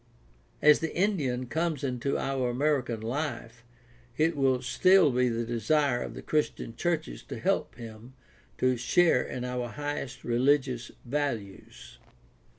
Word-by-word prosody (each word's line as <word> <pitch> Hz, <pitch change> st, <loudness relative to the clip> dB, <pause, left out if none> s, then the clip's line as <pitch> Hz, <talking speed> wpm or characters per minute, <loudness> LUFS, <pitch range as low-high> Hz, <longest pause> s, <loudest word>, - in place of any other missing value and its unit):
As 150 Hz, 0 st, +7 dB
the 160 Hz, -, -4 dB
Indian 150 Hz, -11 st, 0 dB
comes 160 Hz, +3 st, -2 dB
into 130 Hz, +1 st, -1 dB
our 135 Hz, -2 st, -1 dB
American 125 Hz, -3 st, 0 dB
life 115 Hz, -2 st, -4 dB, 0.5 s
it 160 Hz, +1 st, +2 dB
will 135 Hz, -2 st, +2 dB
still 175 Hz, +7 st, +5 dB
be 125 Hz, 0 st, +2 dB
the 115 Hz, 0 st, -2 dB
desire 120 Hz, +3 st, +1 dB
of -, -, -6 dB
the -, -, -8 dB
Christian 150 Hz, -6 st, -1 dB
churches 160 Hz, -, -2 dB
to -, -, -7 dB
help -, -, -1 dB
him 115 Hz, +2 st, -11 dB, 0.4 s
to 130 Hz, -1 st, +2 dB
share 145 Hz, +3 st, +3 dB
in 125 Hz, -1 st, -5 dB
our 125 Hz, -1 st, -3 dB
highest 140 Hz, -2 st, -5 dB
religious 125 Hz, 0 st, +1 dB, 0.2 s
values. 120 Hz, -, -4 dB
130 Hz, 135 wpm, -28 LUFS, 120-150 Hz, 0.5 s, As